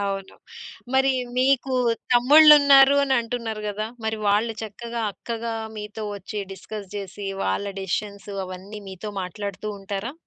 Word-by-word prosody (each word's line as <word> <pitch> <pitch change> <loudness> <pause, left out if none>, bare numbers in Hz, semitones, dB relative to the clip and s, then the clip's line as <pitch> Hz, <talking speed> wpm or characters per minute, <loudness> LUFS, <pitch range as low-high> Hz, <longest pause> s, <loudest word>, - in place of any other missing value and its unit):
అవును. 195 -1 -3 0.6
మరి 265 0 +4 0.3
మీకు 265 0 +2 0.4
తమ్ముళ్ళున్నారు 280 +1 +8
అనంటున్నారు 235 -4 -1
గదా! 215 +1 -3 0.2
మరి 220 0 -1
వాళ్ళు 215 +3 +2
చక్కగా 230 +2 -5
అక్కగా 230 +1 -5 0.2
మీతో 210 +1 -6
వచ్చి 205 +1 -6
డిస్కస్ 200 +1 -8
జేసి 195 0 -6 0.2
వాళ్ళ 95 - -1 0.2
డెసిషన్స్ 200 +2 -4 0.2
అవన్నీ 190 +3 -8
మీతో 190 +3 -7
మాట్లాడుతూ 200 +2 -5
ఉంటారా? 200 +5 -5
215 Hz, 115 wpm, -24 LUFS, 200-240 Hz, 0.6 s, తమ్ముళ్ళున్నారు